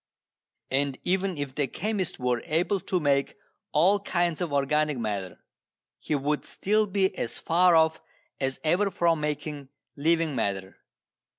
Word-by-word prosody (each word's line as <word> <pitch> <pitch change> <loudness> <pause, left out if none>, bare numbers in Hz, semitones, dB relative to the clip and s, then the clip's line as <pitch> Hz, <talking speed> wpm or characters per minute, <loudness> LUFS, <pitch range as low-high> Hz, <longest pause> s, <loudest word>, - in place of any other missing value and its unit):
And 135 0 0
even 190 -1 0
if 145 -2 -4
the 140 0 0
chemist 195 - -2
were 125 -2 0
able 175 +5 +1
to 180 +1 -1
make 140 -3 +1 0.3
all 185 +7 +4
kinds 175 -4 0
of 170 -4 -2
organic 150 +1 +1
matter, 100 -6 -4 0.6
he 150 - -2
would 145 +2 -1
still 215 +2 +1
be 190 -1 +1
as 115 - -1
far 175 +1 +4
off 160 0 +3 0.4
as 135 -1 -1
ever 180 +6 +2
from 170 -3 +1
making 150 -2 -4 0.3
living 160 0 +1
matter. 95 -4 -2
155 Hz, 140 wpm, -27 LUFS, 140-180 Hz, 0.6 s, all